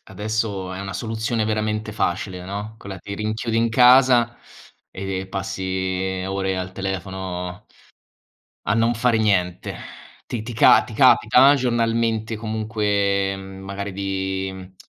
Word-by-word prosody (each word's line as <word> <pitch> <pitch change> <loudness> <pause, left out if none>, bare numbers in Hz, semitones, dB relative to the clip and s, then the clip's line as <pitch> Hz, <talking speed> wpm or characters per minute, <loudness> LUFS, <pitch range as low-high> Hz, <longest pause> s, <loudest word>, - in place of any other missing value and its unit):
adesso 105 -2 -3
è 95 - -6
una 100 0 -5
soluzione 110 +1 -2
veramente 110 0 -2
facile, 90 -2 -2
no, 100 +3 -6
quella: 100 -2 -8
ti 100 +2 -7
rinchiudi 110 +2 -2
in 115 0 +2
casa 125 0 +5 0.5
e 95 0 -4
passi 95 -1 -2
ore 95 -1 -1
al 95 0 -4
telefono 95 0 -5 1.0
a 105 - +3
non 115 +1 +2
fare 115 -1 +2
niente. 90 -5 0 0.5
Ti 115 -3 -4
ti 120 - -6
ca 110 - +6
ti - - -11
capita 135 +3 +6
giornalmente 115 -3 0
comunque, 105 -3 0
mhmm, 95 0 -10
magari 100 0 -5
di 95 0 -2
mhmm, 95 0 -11
100 Hz, 130 wpm, -22 LUFS, 95-110 Hz, 1.0 s, ca